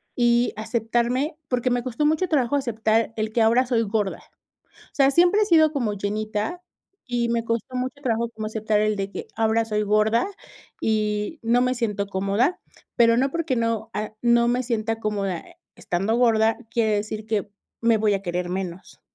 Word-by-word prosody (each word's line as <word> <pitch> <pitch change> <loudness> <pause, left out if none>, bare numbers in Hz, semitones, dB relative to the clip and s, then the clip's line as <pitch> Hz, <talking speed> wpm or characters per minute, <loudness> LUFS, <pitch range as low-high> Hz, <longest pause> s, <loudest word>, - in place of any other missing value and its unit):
y 240 0 +2
aceptarme, 240 +7 -1
porque 250 0 0
me 245 -1 0
costó 255 +4 -1
mucho 315 +5 +2
trabajo 285 -4 +1
aceptar 225 -3 0
el 215 0 -2
que 230 - +2
ahora 235 +4 +4
soy 240 -2 +1
gorda. 205 -2 -2 0.7
O - - -33
sea, 275 -1 +4
siempre 355 +7 +4
he - - +3
sido 315 -5 +5
como 235 -7 -1
llenita 215 - -3 0.4
y 240 -2 -1
me 235 -1 0
costó 230 +2 -3
mucho 255 +2 -3
trabajo 235 -3 0
como 215 -1 -6
aceptar 215 -1 0
el 215 0 +1
de 195 0 -4
que, - - -7
ahora 225 0 +2
soy 210 -1 -1
gorda, 215 - +2 0.5
y 210 +5 -1
no 240 +2 +3
me 255 0 +1
siento 210 -4 -2
cómoda, 200 - 0 0.4
pero 230 -1 +5
no, 270 +2 +2
porque 330 -6 -1
no, 230 -1 -1
ah, 215 0 -4
no 235 0 +4
me 245 +1 +1
sienta 225 -2 -2
cómoda, 200 -5 -2
eh, - - -18 0.2
estando 195 +6 -1
gorda, 225 -2 +3
quiere 220 -2 +2
decir 215 +1 -4
que 210 -2 -2 0.3
me 230 -1 +4
voy 210 -1 +2
a 195 - -4
querer 175 0 -2
menos. 185 -1 -6
225 Hz, 180 wpm, -24 LUFS, 215-245 Hz, 0.7 s, sido